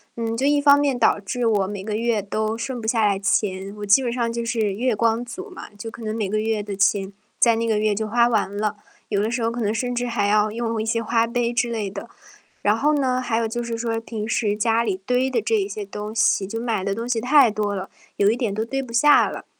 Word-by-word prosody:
嗯， 230 Hz, -1 st, -2 dB
就 265 Hz, -, 0 dB
一 290 Hz, 0 st, +3 dB
方 285 Hz, 0 st, +7 dB
面 280 Hz, -4 st, 0 dB
导 220 Hz, -2 st, +3 dB
致 240 Hz, +5 st, -3 dB
我 205 Hz, -4 st, +2 dB
每 200 Hz, -1 st, -6 dB
个 210 Hz, +1 st, -3 dB
月 225 Hz, -1 st, 0 dB
都 215 Hz, +2 st, -2 dB
剩 255 Hz, +1 st, -4 dB
不 220 Hz, -, -7 dB
下 225 Hz, -2 st, +2 dB
来 200 Hz, -1 st, +2 dB
钱， 195 Hz, 0 st, -1 dB
我 210 Hz, -, -5 dB
基 205 Hz, +7 st, +5 dB
本 240 Hz, -, -1 dB
上 235 Hz, -2 st, -1 dB
就 235 Hz, 0 st, -3 dB
是 220 Hz, -4 st, 0 dB
月 240 Hz, +3 st, 0 dB
光 230 Hz, +2 st, +1 dB
族 375 Hz, -, -8 dB
嘛， 370 Hz, -, -10 dB
就 225 Hz, +2 st, -6 dB
可 230 Hz, 0 st, -11 dB
能 215 Hz, 0 st, -3 dB
每 215 Hz, -4 st, -2 dB
个 215 Hz, +2 st, 0 dB
月 220 Hz, 0 st, -1 dB
的 205 Hz, -1 st, -5 dB
钱， 195 Hz, 0 st, +1 dB, 0.3 s
在 230 Hz, -2 st, +5 dB
那 230 Hz, -, -1 dB
个 220 Hz, -2 st, +1 dB
月 215 Hz, -1 st, +1 dB
就 220 Hz, +2 st, -2 dB
花 235 Hz, +2 st, +3 dB
完 205 Hz, -4 st, 0 dB
了， 210 Hz, 0 st, -1 dB, 0.3 s
有 200 Hz, -, 0 dB
的 220 Hz, -, -1 dB
时 240 Hz, 0 st, -2 dB
候 225 Hz, -, +1 dB
可 235 Hz, +1 st, -4 dB
能 210 Hz, -1 st, 0 dB
甚 245 Hz, +2 st, -2 dB
至 245 Hz, 0 st, -1 dB
还 230 Hz, -4 st, 0 dB
要 210 Hz, +1 st, +3 dB
用 230 Hz, 0 st, -2 dB
一 -, -, -4 dB
些 230 Hz, +1 st, 0 dB
花 230 Hz, 0 st, +1 dB
呗 235 Hz, 0 st, -1 dB
之 240 Hz, -1 st, 0 dB
类 215 Hz, -4 st, -2 dB
的， 190 Hz, -, -8 dB, 0.5 s
然 205 Hz, +1 st, +3 dB
后 295 Hz, +6 st, +2 dB
呢， 255 Hz, -3 st, +1 dB
还 240 Hz, -3 st, -1 dB
有 230 Hz, 0 st, 0 dB
就 240 Hz, +2 st, -3 dB
是 230 Hz, -1 st, -4 dB
说 230 Hz, -1 st, -2 dB
平 220 Hz, -2 st, -5 dB
时 210 Hz, -2 st, 0 dB
家 225 Hz, +1 st, +2 dB
里 200 Hz, -5 st, -2 dB
堆 250 Hz, +3 st, +1 dB
的 245 Hz, -3 st, 0 dB
这 215 Hz, -2 st, +1 dB
些 205 Hz, 0 st, -5 dB
东 210 Hz, +2 st, -6 dB
西， 210 Hz, -3 st, +2 dB
就 225 Hz, +4 st, -5 dB
买 230 Hz, -5 st, -1 dB
的 200 Hz, 0 st, -1 dB
东 230 Hz, +3 st, -4 dB
西 240 Hz, -2 st, 0 dB
太 265 Hz, +1 st, +5 dB
多 210 Hz, -1 st, -2 dB
了， 190 Hz, -1 st, -5 dB, 0.3 s
有 200 Hz, -, +4 dB
一 225 Hz, -, +2 dB
点 235 Hz, -5 st, -2 dB
都 220 Hz, +2 st, -2 dB
堆 270 Hz, +3 st, -3 dB
不 245 Hz, -, -10 dB
下 290 Hz, +5 st, +5 dB
了。 -, -, -8 dB
225 Hz, 290 characters per minute, -22 LUFS, 210-240 Hz, 0.5 s, 方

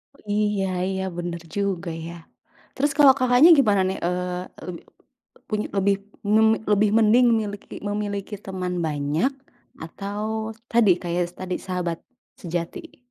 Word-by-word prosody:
Oh, -, -, -23 dB
iya 210 Hz, -2 st, +1 dB, 0.2 s
iya, 190 Hz, 0 st, -2 dB
bener 170 Hz, -1 st, -4 dB
juga 195 Hz, -3 st, -1 dB, 0.2 s
ya. 170 Hz, -, -7 dB, 0.6 s
Terus 285 Hz, +1 st, +1 dB
kalau 280 Hz, -3 st, +8 dB
Kakaknya 255 Hz, +5 st, +6 dB
gimana 205 Hz, -6 st, +4 dB
nih, 190 Hz, -, -2 dB
eee 180 Hz, 0 st, -2 dB, 0.2 s
leb 175 Hz, -2 st, -5 dB, 0.7 s
punya, 215 Hz, -1 st, -1 dB
lebih 200 Hz, +1 st, +3 dB, 0.4 s
mun 220 Hz, +1 st, +6 dB, 0.3 s
lebih 210 Hz, +1 st, +4 dB
mending 225 Hz, +3 st, +5 dB
miliki 205 Hz, -2 st, -6 dB
memiliki 205 Hz, 0 st, -3 dB
teman 185 Hz, -2 st, -3 dB
banyak 150 Hz, -, 0 dB, 0.5 s
atau 200 Hz, +5 st, -5 dB, 0.5 s
tadi, 230 Hz, -3 st, +4 dB
kayak 175 Hz, +1 st, 0 dB, 0.2 s
tadi, 185 Hz, -1 st, -3 dB
sahabat 180 Hz, -3 st, -2 dB, 0.4 s
sejati? 175 Hz, -, -5 dB
195 Hz, 130 wpm, -24 LUFS, 180-215 Hz, 0.7 s, kalau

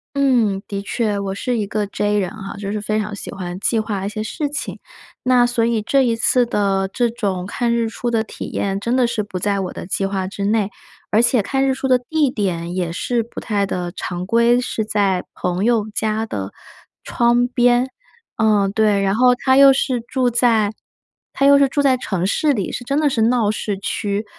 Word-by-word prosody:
嗯， 235 Hz, -8 st, +2 dB
的 200 Hz, -1 st, -4 dB
确。 210 Hz, 0 st, -1 dB
我 195 Hz, -1 st, -3 dB
是 245 Hz, +4 st, -2 dB
一 210 Hz, -, -1 dB
个 210 Hz, +1 st, -2 dB
J 205 Hz, +1 st, 0 dB
人 185 Hz, -3 st, -1 dB
哈， 215 Hz, -3 st, -8 dB
就 200 Hz, -1 st, -5 dB
是 210 Hz, -1 st, -3 dB
非 215 Hz, +1 st, -1 dB
常 210 Hz, -1 st, -4 dB
喜 -, -, -7 dB
欢 180 Hz, -2 st, -6 dB
计 225 Hz, 0 st, +1 dB
划 205 Hz, -3 st, -3 dB
一 -, -, -2 dB
些 215 Hz, 0 st, -5 dB
事 290 Hz, +7 st, -3 dB
情。 290 Hz, -, -5 dB, 0.5 s
那 250 Hz, -1 st, +4 dB
所 240 Hz, -1 st, 0 dB
以 230 Hz, -2 st, +1 dB
这 270 Hz, +5 st, +2 dB
一 230 Hz, -3 st, +1 dB
次 245 Hz, +1 st, +3 dB
的 195 Hz, -3 st, 0 dB
这 240 Hz, -2 st, +1 dB
种 200 Hz, -6 st, -3 dB
看 235 Hz, +2 st, -1 dB
日 230 Hz, -1 st, +1 dB
出 235 Hz, +1 st, -3 dB
的 225 Hz, -1 st, +2 dB
体 -, -, -8 dB
验， 195 Hz, -1 st, -2 dB
真 235 Hz, +5 st, -1 dB
的 245 Hz, -2 st, +3 dB
是 215 Hz, -3 st, -2 dB
不 190 Hz, -3 st, -6 dB
在 200 Hz, 0 st, 0 dB
我 185 Hz, -, -4 dB
的 -, -, -8 dB
计 195 Hz, 0 st, -1 dB
划 190 Hz, -1 st, -2 dB
之 200 Hz, +1 st, -5 dB
内。 210 Hz, -1 st, +1 dB, 0.4 s
而 215 Hz, +2 st, +4 dB
且 240 Hz, -1 st, +3 dB
看 270 Hz, +6 st, 0 dB
日 265 Hz, -, +2 dB
出 265 Hz, 0 st, -3 dB
的 255 Hz, -1 st, +5 dB
地 290 Hz, +3 st, 0 dB
点 180 Hz, -6 st, -2 dB
也 175 Hz, -3 st, -1 dB
是 230 Hz, +6 st, -1 dB
不 235 Hz, -, -9 dB
太 205 Hz, -3 st, -1 dB
的 175 Hz, -2 st, -3 dB
常 180 Hz, 0 st, -4 dB
规， 235 Hz, +3 st, +3 dB
是 225 Hz, -3 st, -2 dB
在 200 Hz, -3 st, 0 dB
朋 180 Hz, +2 st, -2 dB
友 225 Hz, -2 st, +2 dB
家 220 Hz, 0 st, 0 dB
的 95 Hz, -, -5 dB, 0.5 s
窗 240 Hz, +1 st, +2 dB
边。 245 Hz, 0 st, +3 dB, 0.5 s
嗯， 210 Hz, -3 st, +3 dB
对， 210 Hz, -2 st, +2 dB
然 195 Hz, +1 st, +1 dB
后 250 Hz, +1 st, +5 dB
他 260 Hz, +1 st, +2 dB
又 275 Hz, 0 st, +8 dB
是 260 Hz, -2 st, 0 dB
住 255 Hz, -3 st, +1 dB
在 225 Hz, -3 st, +2 dB, 0.6 s
他 275 Hz, -, +1 dB
又 280 Hz, 0 st, +7 dB
是 275 Hz, -, +5 dB
住 285 Hz, -, 0 dB
在 270 Hz, -2 st, +4 dB
城 190 Hz, -7 st, -2 dB
市 295 Hz, +7 st, +2 dB
里， 200 Hz, -6 st, -2 dB
是 245 Hz, -, -4 dB
真 280 Hz, +3 st, 0 dB
的 300 Hz, -2 st, +3 dB
是 230 Hz, -4 st, -1 dB
闹 230 Hz, -3 st, +2 dB
市 205 Hz, -2 st, -3 dB
区。 205 Hz, +1 st, -2 dB
220 Hz, 235 characters per minute, -20 LUFS, 200-245 Hz, 0.6 s, 又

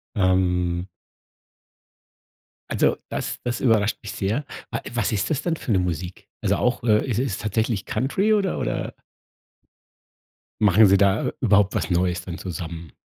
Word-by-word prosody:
Ähm 90 Hz, -2 st, +1 dB, 1.8 s
also, -, -, +2 dB
das -, -, -4 dB
das 120 Hz, 0 st, -2 dB
überrascht 110 Hz, -3 st, +2 dB
mich 105 Hz, -, -6 dB
sehr. 110 Hz, +9 st, -1 dB, 0.3 s
Wa 115 Hz, -, -2 dB
was 110 Hz, -2 st, 0 dB
ist 105 Hz, -, -1 dB
das 150 Hz, -, 0 dB
denn 165 Hz, -2 st, 0 dB
für 125 Hz, -, -6 dB
'ne 95 Hz, -, +4 dB
Musik? 90 Hz, 0 st, -4 dB
Also, -, -, +1 dB
auch 125 Hz, 0 st, 0 dB
äh, 110 Hz, -2 st, +3 dB
ist 115 Hz, -3 st, 0 dB
es 125 Hz, -7 st, -1 dB
tatsächlich 110 Hz, -1 st, -1 dB
Country 195 Hz, +12 st, +1 dB
oder 195 Hz, -3 st, 0 dB
oder -, -, -3 dB, 1.6 s
machen 105 Hz, +1 st, +6 dB
sie 100 Hz, 0 st, +5 dB
da 100 Hz, +1 st, +2 dB
überhaupt 105 Hz, -4 st, +3 dB
was -, -, -1 dB
neues 90 Hz, 0 st, +1 dB
dann 90 Hz, -1 st, -7 dB
zusammen? 85 Hz, -2 st, -6 dB
100 Hz, 145 wpm, -23 LUFS, 90-120 Hz, 1.8 s, machen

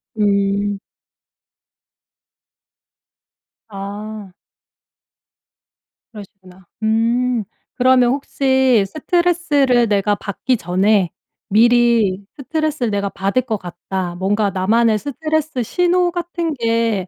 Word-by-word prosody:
음. 200 Hz, -1 st, 0 dB, 2.9 s
아. 205 Hz, 0 st, -7 dB, 1.8 s
그러시구나. 190 Hz, -3 st, -14 dB, 0.2 s
음. 230 Hz, +1 st, +1 dB, 0.3 s
그러면 255 Hz, -1 st, +4 dB
혹시 265 Hz, -5 st, +2 dB
스트레스를 300 Hz, -, +1 dB
내가 205 Hz, 0 st, +1 dB
받기 220 Hz, +5 st, -2 dB
전에 185 Hz, +1 st, +1 dB, 0.4 s
미리 230 Hz, -3 st, +3 dB
'스트레스를 305 Hz, -3 st, -2 dB
내가 200 Hz, -1 st, -1 dB
받을 195 Hz, +7 st, -1 dB
것 220 Hz, -4 st, -2 dB
같다.' 175 Hz, 0 st, -5 dB
뭔가 200 Hz, +3 st, 0 dB
나만의 215 Hz, +4 st, +2 dB
스트레스 310 Hz, 0 st, -2 dB
신호 355 Hz, +6 st, +1 dB
같은 345 Hz, -2 st, -3 dB
게 230 Hz, -6 st, 0 dB
225 Hz, 185 characters per minute, -18 LUFS, 200-265 Hz, 2.9 s, 그러면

